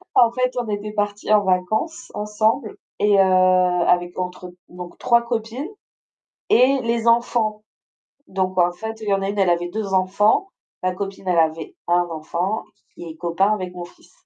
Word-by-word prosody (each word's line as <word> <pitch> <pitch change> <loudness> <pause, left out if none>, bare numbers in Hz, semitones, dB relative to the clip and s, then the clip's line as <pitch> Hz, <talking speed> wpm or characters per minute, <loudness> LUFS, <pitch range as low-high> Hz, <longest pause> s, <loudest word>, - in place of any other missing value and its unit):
en 235 -2 +6
fait, 255 +1 0
on 240 - -2
était 210 0 -4
partis 205 0 -2
en 210 -1 +5
vacances 215 - -1
ensemble 215 +2 0 0.2
et 205 -1 +4
heu, - - +7
avec 180 -1 +3
entre 180 0 -5 0.2
donc 180 0 -10
3 235 -1 +3
copines, 235 +5 -4 0.8
et 260 +3 +4
les 235 0 -1
enfants, 230 -2 +1 0.6
donc 185 -1 -2
en 175 0 +4
fait, 220 +4 -7
il 215 - -6
y 200 - +3
en 195 - -1
a 195 - -1
une, 205 0 -3
elle 190 -2 +3
avait 175 0 0
2 200 0 -3
enfants, 200 - +2 0.3
ma 185 0 0
copine, 195 0 -6
elle 175 -2 +2
avait 160 0 0
1 175 0 +3
enfant 170 +6 -3
q - - -30 0.2
q - - -12
qui - - -7
est 160 - -10
copain 175 +5 +1
avec 185 -3 -4
mon 175 - -6
fils, 175 +1 -18
195 Hz, 185 wpm, -21 LUFS, 180-220 Hz, 0.8 s, heu